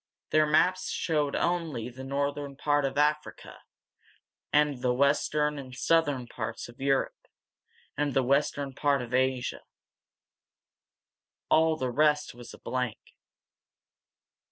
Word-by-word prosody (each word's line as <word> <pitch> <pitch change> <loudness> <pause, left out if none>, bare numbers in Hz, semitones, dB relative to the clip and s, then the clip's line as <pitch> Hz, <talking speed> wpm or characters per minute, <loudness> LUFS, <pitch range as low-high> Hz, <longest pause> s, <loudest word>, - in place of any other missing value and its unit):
Their 155 0 +4
maps 180 +5 +2
showed 150 -4 0
only 165 -9 -1
the 125 +2 -9
northern 140 +1 -2
part 145 -1 +1
of 135 +1 -3
Africa, 150 +1 -1 0.9
the 140 -4 +2
western 150 +2 +1
and 130 -2 -9
southern 145 -5 +1
parts 115 -1 -5
of 120 +2 -15
Europe, 135 -1 0 0.7
and 145 -2 -1
the 135 - +3
western 140 +1 0
part 140 -1 +1
of 120 0 -9
Asia. 130 -1 0 1.9
All 160 0 +4
the 130 -4 -2
rest 150 +2 +2
was 120 0 -11
a - - -12
blank. 125 -3 -3
140 Hz, 115 wpm, -28 LUFS, 130-150 Hz, 1.9 s, Their